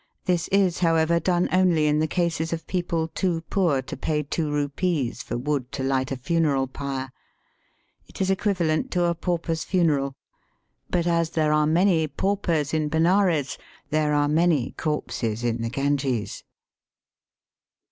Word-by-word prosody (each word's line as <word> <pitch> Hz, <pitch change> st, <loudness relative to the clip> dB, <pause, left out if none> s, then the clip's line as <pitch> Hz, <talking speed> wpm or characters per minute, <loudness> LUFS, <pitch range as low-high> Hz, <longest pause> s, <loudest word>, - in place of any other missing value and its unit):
This 175 Hz, -2 st, +1 dB
is, 195 Hz, -3 st, +2 dB
however, 165 Hz, -1 st, +3 dB
done 175 Hz, 0 st, +1 dB
only 180 Hz, -4 st, +3 dB
in 150 Hz, 0 st, +2 dB
the 155 Hz, -, +1 dB
cases 165 Hz, -1 st, -1 dB
of 165 Hz, -1 st, -4 dB
people 170 Hz, -3 st, -1 dB
too 175 Hz, -2 st, -1 dB
poor 165 Hz, -9 st, +2 dB
to -, -, -7 dB
pay 150 Hz, -1 st, -1 dB
two 150 Hz, +2 st, -2 dB
rupees 145 Hz, -1 st, -1 dB
for -, -, -4 dB
wood 135 Hz, -1 st, -2 dB
to 135 Hz, -, -3 dB
light 130 Hz, 0 st, 0 dB
a 135 Hz, -, -2 dB
funeral 145 Hz, -1 st, +1 dB
pyre. 135 Hz, 0 st, -5 dB, 1.0 s
It -, -, -13 dB
is 190 Hz, 0 st, +1 dB
equivalent 185 Hz, -5 st, 0 dB
to 175 Hz, -, +2 dB
a 170 Hz, -, +2 dB
pauper's 170 Hz, -1 st, -2 dB
funeral; 145 Hz, -7 st, +1 dB, 0.7 s
but 175 Hz, -1 st, 0 dB
as 170 Hz, -1 st, +1 dB
there 155 Hz, -2 st, +1 dB
are 150 Hz, 0 st, +3 dB
many 165 Hz, 0 st, +3 dB
paupers 170 Hz, -4 st, -1 dB
in 155 Hz, -1 st, 0 dB
Benares, 165 Hz, -2 st, +2 dB, 0.3 s
there 150 Hz, -1 st, +2 dB
are 145 Hz, 0 st, +2 dB
many 155 Hz, -4 st, +2 dB
corpses 120 Hz, -7 st, -3 dB
in 120 Hz, -1 st, -1 dB
the 115 Hz, -, -2 dB
Ganges. 135 Hz, -3 st, -1 dB
160 Hz, 150 wpm, -24 LUFS, 140-175 Hz, 1.0 s, however